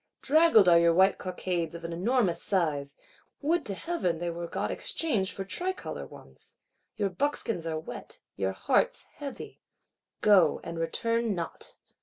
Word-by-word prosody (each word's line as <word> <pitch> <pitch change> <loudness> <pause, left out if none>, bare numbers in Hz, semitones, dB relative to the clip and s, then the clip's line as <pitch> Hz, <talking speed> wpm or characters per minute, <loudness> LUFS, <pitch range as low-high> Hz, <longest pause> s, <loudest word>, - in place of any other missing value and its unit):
Draggled 310 - +5
are 170 -1 +7
your 170 0 +4
white 190 +2 +4
cockades 180 -2 -3
of 170 - -8
an 165 0 -4
enormous 185 -2 +1
size; 150 -7 -1 0.4
would 330 +4 +1
to 200 - -3
Heaven 190 - -1
they 170 +1 -3
were 170 0 -5
got - - -3
exchanged 215 -13 0
for 195 - -5
tricolor 365 - -3
ones! - - -15 0.4
Your 200 -2 0
buckskins 230 - 0
are 160 -1 -2
wet, 155 - -9 0.2
your 95 -1 -1
hearts - - +1
heavy. 280 -2 -8 0.6
Go, 190 -7 +5
and 165 0 -6
return 230 +6 0
not! 170 -2 -6
185 Hz, 150 wpm, -28 LUFS, 170-235 Hz, 0.6 s, are